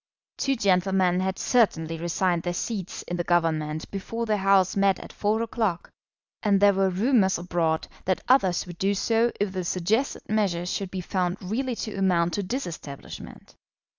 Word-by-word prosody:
Two 275 Hz, -1 st, +1 dB
gentlemen 190 Hz, -4 st, +2 dB
had 190 Hz, 0 st, -1 dB
certainly 165 Hz, -10 st, +2 dB
resigned 175 Hz, +1 st, 0 dB
their 175 Hz, +1 st, -3 dB
seats 195 Hz, -2 st, -4 dB
in 175 Hz, -, -4 dB
the 175 Hz, -, -1 dB
Government 160 Hz, -3 st, 0 dB
before 225 Hz, +4 st, -4 dB
the 215 Hz, -2 st, +1 dB
House 195 Hz, -1 st, +3 dB
met 195 Hz, -2 st, +3 dB
at -, -, -10 dB
four 215 Hz, +2 st, 0 dB
o'clock, 220 Hz, -6 st, -2 dB, 0.5 s
and 200 Hz, -2 st, +3 dB
there 200 Hz, 0 st, +6 dB
were 195 Hz, 0 st, +2 dB
rumours 195 Hz, 0 st, +2 dB
abroad 170 Hz, -2 st, -1 dB, 0.2 s
that 185 Hz, -1 st, 0 dB
others 190 Hz, -10 st, +3 dB
would 175 Hz, -1 st, -10 dB
do 200 Hz, +1 st, +1 dB
so 230 Hz, +3 st, +2 dB
if 205 Hz, -1 st, 0 dB
the 185 Hz, -1 st, -2 dB
suggested 195 Hz, +10 st, -1 dB
measure 195 Hz, -5 st, 0 dB
should 190 Hz, +1 st, -3 dB
be 185 Hz, 0 st, -4 dB
found 180 Hz, 0 st, -1 dB
really 240 Hz, +7 st, -2 dB
to 220 Hz, -1 st, -5 dB
amount 180 Hz, -3 st, +1 dB
to 205 Hz, -, 0 dB
disestablishment. 180 Hz, -, -7 dB
190 Hz, 165 wpm, -26 LUFS, 175-210 Hz, 0.5 s, there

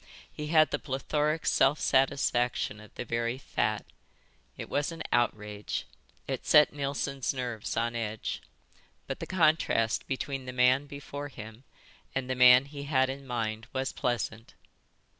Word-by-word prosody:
He 150 Hz, -, -5 dB
had 155 Hz, 0 st, +5 dB
the -, -, 0 dB
plethoric 150 Hz, +3 st, -1 dB
self 140 Hz, +3 st, +3 dB
satisfaction 125 Hz, -5 st, +1 dB
of 110 Hz, -1 st, -14 dB
the -, -, -5 dB
very 115 Hz, +1 st, -1 dB
fat. 110 Hz, -5 st, -1 dB, 0.7 s
It -, -, -6 dB
was 145 Hz, +3 st, -1 dB
an 165 Hz, 0 st, -6 dB
outrage. 105 Hz, -3 st, -1 dB, 0.4 s
It -, -, -3 dB
set 150 Hz, -, +6 dB
Neilson's 140 Hz, -1 st, -2 dB
nerves 120 Hz, -4 st, -4 dB
on 115 Hz, +1 st, 0 dB
edge. 110 Hz, -2 st, -3 dB, 0.6 s
But -, -, -5 dB
the -, -, -5 dB
contrast 155 Hz, -10 st, +2 dB
between 135 Hz, 0 st, -3 dB
the 125 Hz, -, -5 dB
man 130 Hz, +3 st, +3 dB
before 145 Hz, 0 st, -7 dB
him 110 Hz, -1 st, -11 dB, 0.5 s
and 135 Hz, -1 st, -1 dB
the 130 Hz, -, 0 dB
man 125 Hz, +1 st, +7 dB
he 140 Hz, 0 st, -8 dB
had 130 Hz, -2 st, +2 dB
in 135 Hz, 0 st, -9 dB
mind 115 Hz, -2 st, -3 dB
was 130 Hz, 0 st, -2 dB
pleasant. 115 Hz, -2 st, -3 dB
130 Hz, 145 wpm, -29 LUFS, 115-140 Hz, 0.7 s, man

